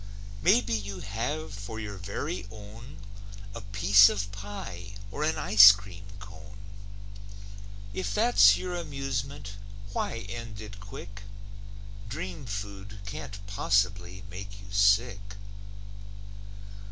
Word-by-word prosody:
Maybe 195 - +4
you 100 -3 -3
have 120 +10 -3
for 110 +2 -7
your 105 -3 -6
very 100 - -4
own 110 +4 -11 0.6
A 115 - -7
piece 100 0 +6
of 100 -1 -3
pie 100 -2 -8 0.2
or 145 - -3
an 160 +1 +1
ice 100 0 +9
cream 100 -1 -8
cone; 100 0 -12 1.4
If 185 - -3
that's 235 +3 +6
your 180 -1 -4
amusement, 135 -7 -4 0.4
why 115 0 -2
end 115 -1 -7
it 105 -1 -9
quick? 100 0 -10 0.9
Dream 95 +3 -6
food 100 -1 -6
can't 100 -1 -7
possibly 95 -2 0
make 100 +1 -9
you 100 0 -13
sick. 100 0 +2
105 Hz, 110 wpm, -28 LUFS, 100-115 Hz, 1.4 s, ice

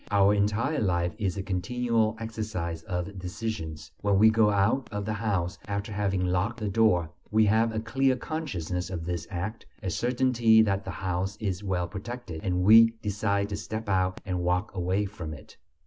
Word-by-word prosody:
Our 100 0 +4
entire 105 +9 +1
life 85 -3 +1
is 95 -4 -1
a 95 - -2
continual 110 +4 0
exercise 105 -7 -4
of 90 +3 -4
decisions. 90 -6 -5
When 100 -1 +2
we 110 +2 +7
go 110 -1 +4
out 100 +6 +1
of 105 -1 -3
the 110 - -1
house 100 -4 -1
after 100 +1 -3
having 100 -3 0
locked 95 +6 0
the 105 -2 -2
door, 95 -6 +3 0.2
we 110 0 +4
have 110 +2 +3
a 110 - -2
clear 130 +4 +1
consciousness 95 - -4
of 85 -3 -4
this 85 -1 -3
act, 105 +6 -5 0.2
a 95 - -1
certainty 120 -1 +3
that 100 -2 0
the - - -5
house 95 +1 -2
is 100 -2 -2
well 90 -3 -1
protected, 100 -3 -7
and 90 -1 0
we 115 +3 +7
decide 100 -1 0
to 100 - -3
step 110 0 -5
out 95 -1 +1
and 90 -2 -2
walk 90 +3 0
away 95 +2 0
from 85 -6 -6
it. 75 - -15
100 Hz, 180 wpm, -28 LUFS, 90-110 Hz, 0.2 s, we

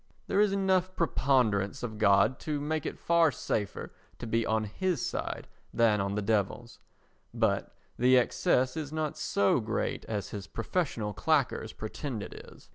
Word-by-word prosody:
There 195 - 0
is 210 -1 +3
enough 190 -1 +1
preponderance 125 - +1
of 110 -3 -5
God 100 +4 +4
to 150 -2 -2
make 155 +1 -2
it - - -5
far 170 -2 +3
safer 105 -4 -3 0.2
to - - -7
be 115 0 0
on 110 0 +1
his 170 - -1
side - - -4 0.2
than 110 -3 +3
on 100 0 -2
the 105 - -1
Devil's, 110 +3 -1 0.6
but - - 0 0.2
the 130 +1 +6
excess 125 +1 +2
is 155 -3 -4
not 155 -1 -2
so 100 +5 +2
great 110 0 -2
as 105 -3 -3
his 100 -2 -6
professional 115 - -2
claqueurs 140 -7 +1
pretend 110 +1 -5
it - - -8
is. - - -14
120 Hz, 160 wpm, -30 LUFS, 105-155 Hz, 0.6 s, the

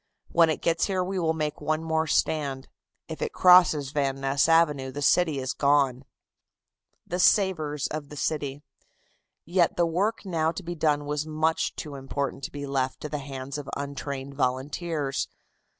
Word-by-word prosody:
When 165 -1 +5
it 155 - -2
gets 170 0 +2
here 190 -2 0
we 190 +1 -2
will 160 -2 +1
make 150 -1 -3
one 155 +1 -1
more 160 0 0
stand. 140 -4 0 0.4
If - - -7
it - - -2
crosses 175 -6 +6
Van 135 -2 -1
Ness 135 +3 +1
Avenue 150 -5 +3
the 145 +2 -4
city 160 0 +3
is 130 -1 -2
gone." 140 -2 +2 1.0
THE 180 - -3
SAVERS 160 -7 +2
OF 150 -2 -5
THE 150 - -9
CITY. 145 -1 -3 0.8
Yet 175 0 +2
the 175 - +4
work 200 +7 -1
now 165 -4 0
to 190 - -7
be 175 0 -4
done 150 -3 +1
was 150 +1 -2
much 155 +1 0
too 150 - -6
important 140 0 -4
to - - -7
be 145 0 -6
left 135 -2 -1
to 150 - -5
the 150 0 -3
hands 135 0 -6
of 140 - -8
untrained 140 -1 -5
volunteers. 140 +3 -2
150 Hz, 170 wpm, -26 LUFS, 140-165 Hz, 1.0 s, crosses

